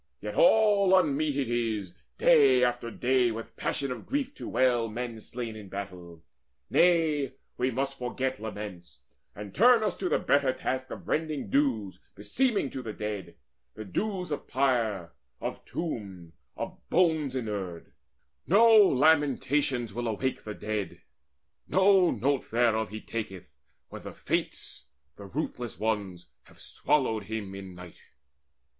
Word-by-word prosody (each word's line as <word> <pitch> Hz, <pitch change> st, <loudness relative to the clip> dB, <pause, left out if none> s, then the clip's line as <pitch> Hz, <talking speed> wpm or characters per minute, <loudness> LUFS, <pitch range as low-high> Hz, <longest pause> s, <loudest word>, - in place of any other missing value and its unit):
Yet -, -, -5 dB
all 210 Hz, -, +5 dB
unmeet 150 Hz, -4 st, +1 dB
it 135 Hz, -3 st, 0 dB
is 110 Hz, -6 st, -2 dB, 0.2 s
Day 130 Hz, -4 st, +5 dB
after 120 Hz, -1 st, 0 dB
day 125 Hz, +1 st, +2 dB
with 115 Hz, 0 st, -7 dB
passion 140 Hz, -2 st, -2 dB
of 125 Hz, -, -7 dB
grief 275 Hz, 0 st, -2 dB
to -, -, -7 dB
wail 120 Hz, -3 st, +2 dB
Men 115 Hz, 0 st, -5 dB
slain 115 Hz, 0 st, -6 dB
in 105 Hz, -3 st, -10 dB
battle: 90 Hz, -4 st, -8 dB, 0.5 s
nay, 160 Hz, -6 st, +3 dB, 0.2 s
we 125 Hz, +1 st, 0 dB
must 135 Hz, +2 st, -3 dB
forget 130 Hz, +1 st, -2 dB
Laments, 105 Hz, -5 st, -8 dB, 0.3 s
and 105 Hz, -1 st, -8 dB
turn 235 Hz, +1 st, +5 dB
us 200 Hz, -4 st, 0 dB
to 185 Hz, -, -2 dB
the -, -, +3 dB
better 140 Hz, -2 st, +2 dB
task 130 Hz, 0 st, -3 dB
Of -, -, -9 dB
rendering 155 Hz, -9 st, -2 dB
dues 120 Hz, -9 st, +1 dB, 0.2 s
beseeming 215 Hz, -, 0 dB
to 130 Hz, -, -5 dB
the 110 Hz, -3 st, -6 dB
dead, 105 Hz, -2 st, -5 dB, 0.4 s
The 110 Hz, -, -7 dB
dues 185 Hz, -, -3 dB
of 145 Hz, -, -4 dB
pyre, 115 Hz, -10 st, 0 dB, 0.3 s
of -, -, -5 dB
tomb, 95 Hz, -, -5 dB, 0.2 s
of -, -, -5 dB
bones 160 Hz, -6 st, +2 dB
inurned. 100 Hz, -8 st, -4 dB, 0.6 s
No 225 Hz, +5 st, +6 dB
lamentations 140 Hz, -, +3 dB
will 120 Hz, +2 st, -3 dB
awake 125 Hz, +4 st, -2 dB
the 105 Hz, -1 st, -5 dB
dead; 105 Hz, -3 st, -4 dB, 0.6 s
No 190 Hz, -2 st, +5 dB
note 140 Hz, 0 st, 0 dB
thereof 110 Hz, -2 st, +2 dB
he 110 Hz, +2 st, -7 dB
taketh, 95 Hz, -8 st, -6 dB, 0.4 s
when -, -, -9 dB
the -, -, -8 dB
Fates, 70 Hz, -, -4 dB, 0.3 s
The 100 Hz, -, -10 dB
ruthless 125 Hz, -1 st, -4 dB
ones, 100 Hz, -5 st, -2 dB, 0.2 s
have -, -, -20 dB
swallowed 110 Hz, -8 st, 0 dB
him 105 Hz, -2 st, -5 dB
in 95 Hz, -2 st, -9 dB
night." 90 Hz, -1 st, -12 dB
125 Hz, 140 wpm, -28 LUFS, 105-150 Hz, 0.6 s, No